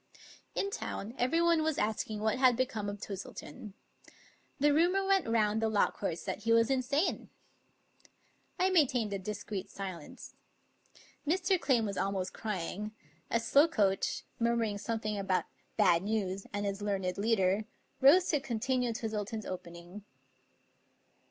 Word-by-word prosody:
In 400 - -1
town 220 - -5
everyone 330 +6 +3
was 310 -2 0
asking 215 0 -1
what 220 +3 +1
had 255 -3 +5
become 220 -5 -1
of 205 0 -6
Twis 195 -2 -5
tleton. 190 +7 -10 0.9
The 290 +1 +4
rumor 360 +5 +3
went 390 -5 +2
round 220 -1 +2
the 225 - +2
law 210 -2 +2
courts 170 -4 -4
that - - -3
he 230 - -1
was 230 +2 +4
insane. 275 +6 0 1.3
I 375 +1 +2
maintained 250 - +2
a 200 - -2
discreet 205 0 -5
silence. 185 -6 -8 0.9
Mr. 370 +3 +2
Clame 260 -5 +2
was 200 -2 -3
almost 190 -1 -1
crying, 210 +1 -4 0.3
as 230 0 +1
Slokoach, 225 -11 +3 0.2
murmuring 230 -3 +1
something 215 -1 -2
about 190 -2 +1 0.2
" - - -40
bad 170 0 +5
news, 195 -2 -2
and 205 0 -2
his 200 0 -3
learned 195 -3 -1
leader," 205 -1 +2 0.3
rose 320 +7 +7
to 300 - +2
continue 250 -1 -1
Twis 220 0 -4
tleton's 215 +1 -3
opening. 175 +2 -8
220 Hz, 140 wpm, -32 LUFS, 200-260 Hz, 1.3 s, rose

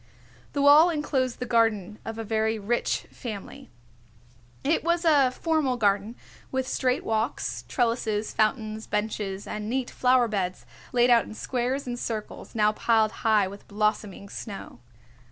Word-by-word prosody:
The 285 - 0
wall 295 +4 +8
enclosed 275 -6 -1
the 250 - -4
garden 220 -4 +1
of 225 0 -5
a 225 - -3
very 220 0 0
rich 220 +3 0
family. 215 -6 -8 0.9
It 310 +4 +1
was 340 +1 +1
a 285 -5 +5
formal 285 -2 0
garden 205 +1 +1 0.4
with 260 -1 -1
straight 255 0 0
walks, 215 - -2
trellises, 225 - 0
fountains, 215 0 0
benches 210 -2 -2
and 210 0 -5
neat 255 +1 -1
flower 250 -1 +3
beds 190 -4 -3 0.3
laid 245 0 +4
out 235 -1 +5
in 215 - -9
squares 255 +4 -2
and 245 -1 -4
circles, 220 -1 -5
now 210 -1 +4
piled 220 0 +2
high 215 -3 +3
with 200 +1 -11
blossoming 210 -1 -1
snow. 200 - -8
225 Hz, 145 wpm, -26 LUFS, 210-255 Hz, 0.9 s, wall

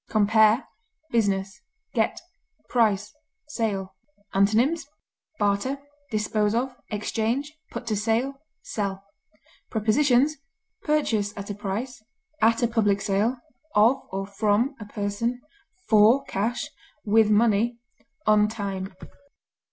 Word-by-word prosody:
Compare 220 +3 +4 0.4
BUSINESS; 195 -3 0 0.3
GET; - - +1 0.5
PRICE; 210 -4 +2 0.4
SALE. 200 -8 -2 0.4
Antonyms: 235 +11 +2 0.5
barter, 205 +7 +1 0.3
dispose 215 -1 0
of, 250 +2 -1
exchange, 230 +7 -1 0.2
put - - -6
to 220 -2 -1
sale, 225 +6 0 0.3
sell. 195 -2 -3 0.7
Prepositions: 255 +6 +3 0.4
Purchase 220 -10 0
at 200 0 -5
a - - -2
price; 215 +5 -4 0.4
at 230 +2 +4
a - - +5
public 210 -4 +2
sale; 205 +5 +1 0.4
of 225 +6 +5
or 195 0 -3
from 210 +6 +1
a 210 - -7
person; 210 +4 -2 0.5
for 220 +5 +6
cash; 235 +8 -2 0.3
with 215 0 +4
money; 225 +2 +3 0.5
on 210 0 +5
time. 195 -3 -4
215 Hz, 105 wpm, -25 LUFS, 205-235 Hz, 0.7 s, for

